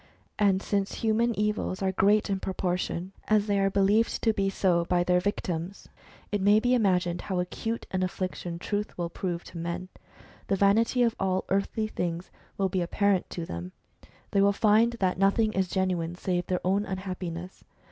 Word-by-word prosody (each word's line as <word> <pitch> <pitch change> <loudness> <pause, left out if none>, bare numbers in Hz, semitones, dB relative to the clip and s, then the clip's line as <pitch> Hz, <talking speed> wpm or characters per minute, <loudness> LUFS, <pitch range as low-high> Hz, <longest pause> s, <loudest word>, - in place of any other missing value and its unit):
And 195 -2 +3
since 200 -1 -1
human 225 +1 +2
evils 210 -2 -1
are 190 - +2
great 205 +3 +3
in 195 -2 -1
proportion 180 -1 -2 0.2
as 215 -1 +3
they 200 -1 +1
are 195 0 +3
believed 200 +3 +2
to 225 - +3
be 195 -1 0
so 180 -3 +2
by 175 0 +2
their 180 0 +3
victims, 180 -1 -3 0.4
it 205 -1 0
may 205 +2 +5
be 245 +3 +2
imagined 180 -7 +2
how 185 -2 -2
acute 225 +6 -3
an 185 - -1
affliction 185 -2 -3
Truth 205 +4 -3
will 170 -1 -2
prove 175 -2 -3
to 170 - -9
men. 170 +2 -4 0.6
The 195 - +2
vanity 220 +5 +3
of 230 -1 +1
all 190 -1 0
earthly 200 +3 0
things 175 -4 -4 0.3
will 195 - +2
be 185 0 -1
apparent 195 +2 +1
to 170 - -5
them; 90 - -6 0.6
they 200 - +3
will 200 0 +4
find 220 +3 +4
that 190 -6 -1
nothing 215 +3 +3
is 190 -1 +1
genuine 180 -3 -1
save 180 -1 -2
their 180 -1 -2
own 195 +2 +2
unhappiness. 185 -2 -6
190 Hz, 180 wpm, -28 LUFS, 180-205 Hz, 0.6 s, may